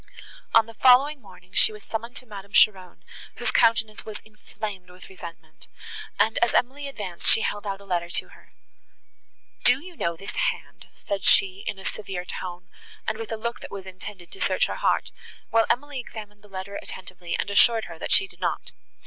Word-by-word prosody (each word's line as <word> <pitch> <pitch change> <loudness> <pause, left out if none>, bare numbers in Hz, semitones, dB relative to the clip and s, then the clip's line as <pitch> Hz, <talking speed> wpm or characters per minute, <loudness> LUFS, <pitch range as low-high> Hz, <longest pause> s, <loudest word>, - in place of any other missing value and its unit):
On 225 -1 +8
the 230 - -11
following 265 +5 +6
morning, 185 -2 -16
she - - +5
was 210 -1 -11
summoned 230 +2 -4
to 255 - -5
Madame 200 -3 -10
Cheron, 190 -4 +4 0.3
whose - - -1
countenance 220 -1 +3
was 215 -1 -6
inflamed 210 -3 -7
with 180 0 -13
resentment, 170 -3 -11 0.5
and, 220 - +3
as 235 - +3
Emily 280 +3 +1
advanced, 200 -10 -2
she 225 - +5
held 205 -1 -2
out 195 -1 -2
a 200 - -14
letter 175 -2 -1
to - - -1
her. - - -18 1.1
"Do 250 +2 +5
you 350 +3 -11
know 170 - -1
this 195 - -7
hand?" - - -2
said 195 -2 -3
she, 190 0 +5
in - - -2
a 190 - -10
severe 190 -4 -4
tone, 180 0 -6 0.4
and 215 - -1
with 225 - -5
a 225 - -1
look 235 +2 -3
that - - -8
was 195 -1 -7
intended 185 -1 -9
to - - -7
search - - +3
her - - -3
heart, - - +1 0.4
while 225 0 +4
Emily 285 +1 0
examined 210 -4 -9
the 210 - -17
letter 195 +1 -5
attentively, 185 -2 -5
and 205 - -2
assured 225 +2 +6
her, 165 -2 -10
that - - -4
she 195 - +6
did 175 -2 -17
not. 180 - -1
205 Hz, 195 wpm, -26 LUFS, 185-225 Hz, 1.1 s, On